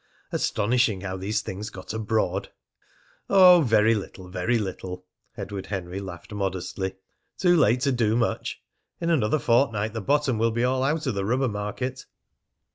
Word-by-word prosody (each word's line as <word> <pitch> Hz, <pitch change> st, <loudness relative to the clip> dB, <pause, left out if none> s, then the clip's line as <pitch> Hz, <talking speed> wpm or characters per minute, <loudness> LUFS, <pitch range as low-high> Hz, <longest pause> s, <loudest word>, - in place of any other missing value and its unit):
Astonishing 110 Hz, -2 st, +1 dB
how 95 Hz, -1 st, -4 dB
these 105 Hz, +3 st, -1 dB
things 105 Hz, +1 st, -6 dB
got 95 Hz, +2 st, -8 dB
abroad! 110 Hz, -3 st, -1 dB, 0.8 s
"Oh, 180 Hz, -3 st, +8 dB
very 110 Hz, -2 st, +4 dB
little, 95 Hz, -3 st, -6 dB
very 95 Hz, +6 st, 0 dB
little!" 95 Hz, -3 st, -5 dB, 0.3 s
Edward 100 Hz, -2 st, -6 dB
Henry 95 Hz, -1 st, -4 dB
laughed 95 Hz, 0 st, -9 dB
modestly. 95 Hz, -1 st, -3 dB, 0.4 s
"Too 175 Hz, -2 st, +4 dB
late 125 Hz, -5 st, +3 dB
to 140 Hz, 0 st, +2 dB
do 115 Hz, -3 st, +1 dB
much! 120 Hz, -1 st, -1 dB, 0.4 s
In 170 Hz, 0 st, 0 dB
another 135 Hz, -3 st, +2 dB
fortnight 115 Hz, -5 st, +1 dB
the 115 Hz, -, -3 dB
bottom 140 Hz, -1 st, +1 dB
will 115 Hz, +1 st, +3 dB
be 120 Hz, +1 st, -1 dB
all 130 Hz, +1 st, +1 dB
out 150 Hz, +4 st, 0 dB
of 130 Hz, -, 0 dB
the 100 Hz, -1 st, -2 dB
rubber 125 Hz, +5 st, +1 dB
market!" 115 Hz, +5 st, -4 dB
110 Hz, 155 wpm, -25 LUFS, 95-125 Hz, 0.8 s, Oh